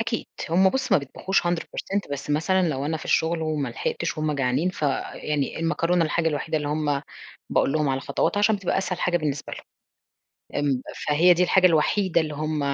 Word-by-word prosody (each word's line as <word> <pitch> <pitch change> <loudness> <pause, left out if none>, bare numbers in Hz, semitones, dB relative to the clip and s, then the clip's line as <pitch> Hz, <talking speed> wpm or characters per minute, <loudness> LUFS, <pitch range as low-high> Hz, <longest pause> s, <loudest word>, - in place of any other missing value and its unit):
أكيد، 225 0 -2 0.2
هُم 190 +3 +5
بُصّ 260 +2 -1
ما 195 - +6
بيطبخوش 150 +7 -1
hundred 175 -1 0
percent، 200 -6 -3
بس 140 +1 -5
مثلًا 180 +4 +2
لو 140 -2 -2
أنا 160 +1 -1
في - - -9
الشغل 165 0 +1
وما 155 -4 -1
لحقتش 170 +7 -3
وهُم 155 -1 0
جعانين، 135 +4 0
فيعني 145 -1 -2
المكرونة 165 +1 +1
الحاجة 165 +1 +1
الوحيدة 155 +1 -2
اللي 145 - -3
هُم 150 -2 0 0.5
باقول - - +2
لهم 150 -2 +1
على 135 0 0
خطواتها 205 - 0
عشان 210 +1 +3
بتبقى 195 -2 -1
أسهل 180 -2 -2
حاجة 180 -1 +2
بالنسبة 145 -4 -3
لهم، - - -7 1.0
ام 130 -3 +1 0.3
فهي 165 +5 +5
دي 180 - +2
الحاجة 185 +1 +4
الوحيدة 170 +2 +3
اللي 155 -1 -4
هُم 155 +1 -2
160 Hz, 190 wpm, -24 LUFS, 145-180 Hz, 1.0 s, ما